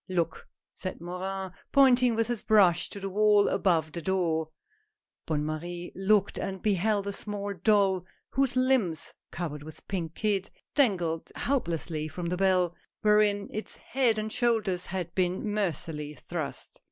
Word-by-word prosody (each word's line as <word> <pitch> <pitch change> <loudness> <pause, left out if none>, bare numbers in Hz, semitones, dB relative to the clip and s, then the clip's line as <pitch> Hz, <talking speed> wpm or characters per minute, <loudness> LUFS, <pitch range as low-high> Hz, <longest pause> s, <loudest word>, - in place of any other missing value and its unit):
" - - -40
Look! 170 -3 -1
" - - -64
said 185 - -5
Morin, 185 +2 -4 0.2
pointing 255 -3 +5
with 225 0 +2
his 240 -1 -2
brush 185 -6 +4
to 200 - -7
the 195 - -4
wall, 205 +1 +4
above 165 -5 +2
the 170 - -5
door. 165 -3 0 0.8
Bonne 150 -2 0
Marie 175 +3 -4
looked 195 +2 +2
and 190 0 -3
beheld 205 +1 +1
a 200 - -2
small 205 0 -3
doll 190 -1 +2 0.2
whose 270 -2 +1
limbs, 255 -11 +1 0.2
covered 155 -4 -4
with 155 +1 -11
pink 170 -4 -3
kid, 205 -3 0 0.2
dangled 175 - +1
helplessly 170 - -1
from 170 +3 -6
the 180 - -1
bell, 185 -2 +3 0.3
wherein 210 -1 +4
its 215 - -5
head 245 -4 +1
and 215 0 -2
shoulders 215 -7 +1
had 175 -2 -4
been 185 +2 0
mer 205 -4 +2
cilessly 150 -1 -6
thrust. 160 -5 -6
190 Hz, 155 wpm, -28 LUFS, 170-210 Hz, 0.8 s, pointing